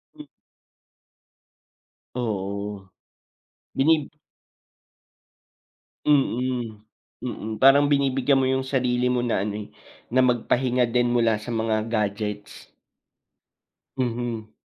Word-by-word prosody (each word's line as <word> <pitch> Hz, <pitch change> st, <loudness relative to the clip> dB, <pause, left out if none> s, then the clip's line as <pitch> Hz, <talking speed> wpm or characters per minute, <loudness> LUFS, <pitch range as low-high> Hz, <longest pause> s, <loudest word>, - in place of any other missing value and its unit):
Hmm. -, -, -10 dB, 1.9 s
Oo. 100 Hz, -3 st, -4 dB, 0.9 s
Binib 150 Hz, +1 st, +2 dB, 2.0 s
Mm. 125 Hz, -6 st, +1 dB, 0.4 s
Mm, 110 Hz, -3 st, -5 dB
parang 140 Hz, +2 st, +7 dB
binibigyan 135 Hz, -1 st, +2 dB
mo 130 Hz, -, +1 dB
yung 130 Hz, 0 st, 0 dB
sarili 125 Hz, -2 st, 0 dB
mo 125 Hz, -1 st, +1 dB
na 115 Hz, -5 st, 0 dB
ano, 105 Hz, -, -3 dB
eh, -, -, -10 dB, 0.4 s
na 130 Hz, +2 st, +3 dB
magpahinga 125 Hz, 0 st, +1 dB
din 120 Hz, +1 st, +2 dB
mula 115 Hz, -3 st, +3 dB
sa 115 Hz, +3 st, -6 dB
mga 110 Hz, -1 st, 0 dB
gadgets. 105 Hz, -2 st, -3 dB, 1.3 s
Mhm. 120 Hz, -3 st, -3 dB
120 Hz, 90 wpm, -24 LUFS, 110-130 Hz, 2.0 s, parang